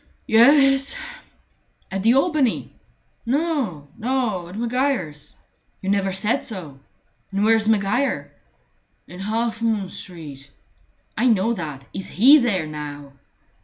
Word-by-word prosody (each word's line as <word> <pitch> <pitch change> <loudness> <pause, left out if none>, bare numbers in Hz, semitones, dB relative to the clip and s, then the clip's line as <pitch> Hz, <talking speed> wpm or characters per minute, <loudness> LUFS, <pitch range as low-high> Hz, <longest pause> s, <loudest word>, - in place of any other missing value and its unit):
"Ye 225 - +3
e 275 +2 +7
es." 270 0 -3 1.0
"At 195 0 -2
the 230 +5 +4
Albany?" 280 -4 +1 0.5
"No, 255 - -1
no; 230 -7 -1
at 180 +4 -9
Maguire's." 230 - -2 0.4
"You 195 - -2
never 195 -1 +1
said 210 +8 -1
so. 165 - -8 0.5
And 200 +1 0
where's 220 0 +3
Maguire?" 220 +6 0 0.8
"In 180 - -11
Half 225 +3 -2
moon 215 -5 0
Street." 145 -6 -10 0.7
"I 250 - +2
know 225 0 +3
that. 150 - -6
Is 195 - -5
he 275 +9 +6
there 205 - 0
now?" 145 -2 -8
215 Hz, 125 wpm, -22 LUFS, 180-250 Hz, 1.0 s, e